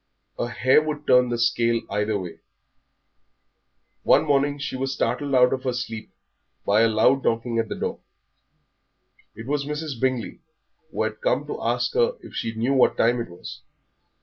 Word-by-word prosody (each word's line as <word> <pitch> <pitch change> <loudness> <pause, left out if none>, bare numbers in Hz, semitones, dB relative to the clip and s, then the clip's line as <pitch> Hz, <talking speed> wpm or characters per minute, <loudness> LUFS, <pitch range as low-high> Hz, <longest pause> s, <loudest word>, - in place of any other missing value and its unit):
A - - -1
hair 130 +5 +3
would 150 -1 -4
turn 125 -1 +4
the 120 - -1
scale 115 0 +2
either 105 0 0
way. 90 -3 -8 1.6
One - - +4
morning 145 0 +1
she 140 -2 -5
was 135 +1 -2
startled 130 +4 -1
out 125 0 +5
of 130 - -2
her 130 - -1
sleep 115 -3 -5 0.6
by 105 +2 +3
a 115 - +5
loud 115 +5 +3
knocking 115 0 0
at 115 -1 -1
the - - -3
door. - - -4 1.4
It 115 - -9
was 140 +1 -1
Mrs. 150 -4 -5
Bingley, 130 -2 -1 0.5
who - - -2
had - - -4
come - - 0
to - - -6
ask - - 0
her 480 +1 +2
if - - -13
she 115 0 -3
knew 120 +5 0
what 130 - +3
time 120 +1 +2
it 115 - -6
was. 85 - -10
125 Hz, 175 wpm, -24 LUFS, 115-140 Hz, 1.6 s, out